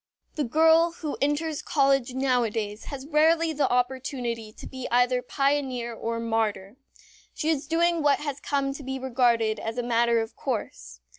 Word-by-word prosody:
The 300 Hz, -, -1 dB
girl 320 Hz, +5 st, +4 dB
who 310 Hz, -3 st, -5 dB
enters 295 Hz, +2 st, 0 dB
college 275 Hz, -3 st, +1 dB
nowadays 230 Hz, -5 st, -1 dB
has 275 Hz, -2 st, -7 dB
rarely 320 Hz, +2 st, +3 dB
the 295 Hz, -1 st, +1 dB
opportunity 245 Hz, -3 st, -2 dB
to -, -, -12 dB
be 260 Hz, -1 st, -6 dB
either 245 Hz, +1 st, +3 dB
pioneer 265 Hz, -3 st, -1 dB
or 230 Hz, 0 st, -3 dB
martyr. 220 Hz, -2 st, -2 dB, 0.6 s
She 310 Hz, -, -1 dB
is 295 Hz, -3 st, 0 dB
doing 335 Hz, +1 st, +2 dB
what 290 Hz, -1 st, +4 dB
has 290 Hz, -2 st, -5 dB
come 275 Hz, -1 st, -1 dB
to 285 Hz, -, -8 dB
be 265 Hz, 0 st, -4 dB
regarded 235 Hz, -4 st, +1 dB
as 225 Hz, +2 st, -5 dB
a 245 Hz, -, -1 dB
matter 235 Hz, 0 st, +2 dB
of 225 Hz, 0 st, -4 dB
course. 65 Hz, -, -5 dB
260 Hz, 160 wpm, -26 LUFS, 230-290 Hz, 0.6 s, girl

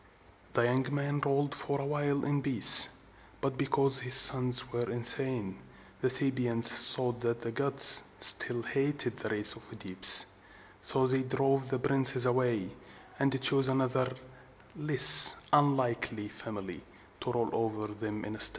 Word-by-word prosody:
This 120 Hz, -, -3 dB
young 130 Hz, +3 st, -6 dB
man 145 Hz, 0 st, -8 dB
ruled 140 Hz, 0 st, -6 dB
for 140 Hz, -1 st, -8 dB
a 140 Hz, -, -8 dB
while 145 Hz, -1 st, -7 dB
in 145 Hz, 0 st, -6 dB
peace; 130 Hz, -7 st, +7 dB, 0.5 s
but 135 Hz, -1 st, -8 dB
because 135 Hz, -1 st, -3 dB
his 125 Hz, 0 st, -2 dB
sons 125 Hz, -2 st, +3 dB
were 120 Hz, 0 st, -8 dB
insane, 120 Hz, -, -5 dB, 0.4 s
the 130 Hz, -, -5 dB
Thebans 125 Hz, -3 st, -2 dB
thought 125 Hz, -2 st, -8 dB
that 120 Hz, -1 st, -8 dB
the 115 Hz, -, -10 dB
gods 140 Hz, +3 st, +4 dB
still 120 Hz, -1 st, +2 dB
hated 140 Hz, -1 st, -6 dB
the -, -, -10 dB
race 105 Hz, -1 st, +2 dB
of 115 Hz, -, -17 dB
OEdipus: 100 Hz, -4 st, +6 dB, 0.6 s
so 130 Hz, -1 st, -6 dB
they 130 Hz, +1 st, -3 dB
drove 135 Hz, 0 st, -6 dB
these 130 Hz, -1 st, -7 dB
princes 135 Hz, -2 st, +1 dB
away, 120 Hz, -6 st, -6 dB, 0.5 s
and 135 Hz, -1 st, -5 dB
chose 135 Hz, 0 st, -1 dB
another 130 Hz, -1 st, -6 dB, 0.6 s
and 150 Hz, -2 st, -14 dB
less 135 Hz, -2 st, +7 dB, 0.2 s
unlucky 130 Hz, -7 st, -5 dB
family 105 Hz, -4 st, -14 dB, 0.4 s
to 125 Hz, -, -10 dB
rule 120 Hz, -2 st, -7 dB
over 110 Hz, -1 st, -8 dB
them 105 Hz, 0 st, -12 dB
instead. 105 Hz, 0 st, +3 dB
130 Hz, 145 wpm, -24 LUFS, 115-140 Hz, 0.6 s, peace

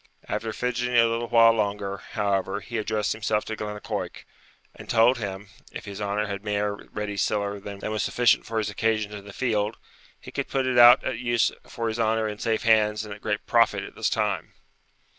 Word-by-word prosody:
After 110 Hz, -, -2 dB
fidgeting 125 Hz, +1 st, -1 dB
a 115 Hz, -, +7 dB
little 115 Hz, +1 st, -1 dB
while 115 Hz, -1 st, +6 dB
longer, 100 Hz, -2 st, -2 dB, 0.2 s
however, 100 Hz, -2 st, 0 dB
he 115 Hz, +2 st, -5 dB
addressed 110 Hz, 0 st, -1 dB
himself 110 Hz, 0 st, -1 dB
to 110 Hz, -, -4 dB
Glennaquoich, 105 Hz, -1 st, -5 dB, 0.5 s
and -, -, -13 dB
told 120 Hz, +2 st, +4 dB
him, 100 Hz, -1 st, -5 dB, 0.2 s
if -, -, -8 dB
his 100 Hz, 0 st, -7 dB
honour 105 Hz, +1 st, -1 dB
had 100 Hz, -1 st, -5 dB
mair 105 Hz, -1 st, -1 dB, 0.2 s
ready 105 Hz, -1 st, -4 dB
siller 100 Hz, 0 st, -1 dB
than 100 Hz, 0 st, -8 dB
was 110 Hz, 0 st, -2 dB
sufficient 120 Hz, -2 st, +3 dB
for 115 Hz, -, -3 dB
his 105 Hz, -1 st, -1 dB
occasions 110 Hz, 0 st, 0 dB
in 100 Hz, -1 st, -8 dB
the 100 Hz, -, -9 dB
field, 110 Hz, -2 st, -1 dB, 0.4 s
he -, -, -11 dB
could -, -, -3 dB
put 135 Hz, -1 st, -1 dB
it 125 Hz, -1 st, +2 dB
out 120 Hz, 0 st, +9 dB
at 115 Hz, -, -3 dB
use 120 Hz, -1 st, +2 dB, 0.2 s
for 115 Hz, -1 st, -4 dB
his 110 Hz, +1 st, -3 dB
honour 110 Hz, 0 st, +1 dB
in 105 Hz, -1 st, -6 dB
safe 110 Hz, -2 st, -1 dB
hands 110 Hz, -1 st, +3 dB
and 105 Hz, -, -7 dB
at 105 Hz, -, -12 dB
great -, -, -2 dB
profit -, -, +3 dB
at -, -, -9 dB
this -, -, -1 dB
time. -, -, -1 dB
110 Hz, 200 wpm, -25 LUFS, 105-115 Hz, 0.5 s, out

